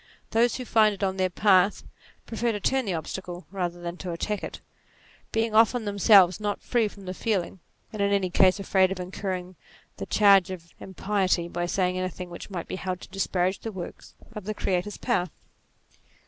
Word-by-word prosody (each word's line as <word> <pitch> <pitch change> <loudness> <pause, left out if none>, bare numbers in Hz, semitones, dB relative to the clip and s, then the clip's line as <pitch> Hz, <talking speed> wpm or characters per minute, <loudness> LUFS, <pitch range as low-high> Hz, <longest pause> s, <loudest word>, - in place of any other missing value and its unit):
Those 235 +2 +3
who 255 - -5
find 215 -2 +4
it 200 - -7
on 190 -1 0
their 185 -1 +1
path, 195 +1 +3 0.4
prefer 230 +1 -1
to 205 - -3
turn 265 +4 +1
the 195 - -1
obstacle 175 +2 -6
rather 175 -3 -3
than 175 0 -6
to 185 - -6
attack 205 +5 -3
it, - - -6 0.7
being 225 0 0
often 225 +1 +4
themselves 200 -2 +5
not 205 -1 -3
free 235 -3 +1
from 200 -1 -12
the 185 - -4
feeling, 190 -3 -2 0.3
and 215 - -3
in 200 0 +2
any 195 -3 +1
case 185 +2 +4
afraid 190 -1 +2
of 190 - -4
incurring 185 0 -5 0.4
the - - -6
charge 200 -3 +5
of 175 -3 -8
impiety 190 -2 -1
by 175 0 -3
saying 185 0 0
anything 185 -1 -5
which 175 - -9
might 180 -4 -5
be - - -4
held 185 -1 -4
to - - -11
disparage 190 -1 -1
the 225 - -5
works 185 -4 -9 0.2
of 210 -3 -7
the 215 +1 -3
Creator's 190 +2 -1
power. 210 -8 0
190 Hz, 190 wpm, -26 LUFS, 180-210 Hz, 0.7 s, themselves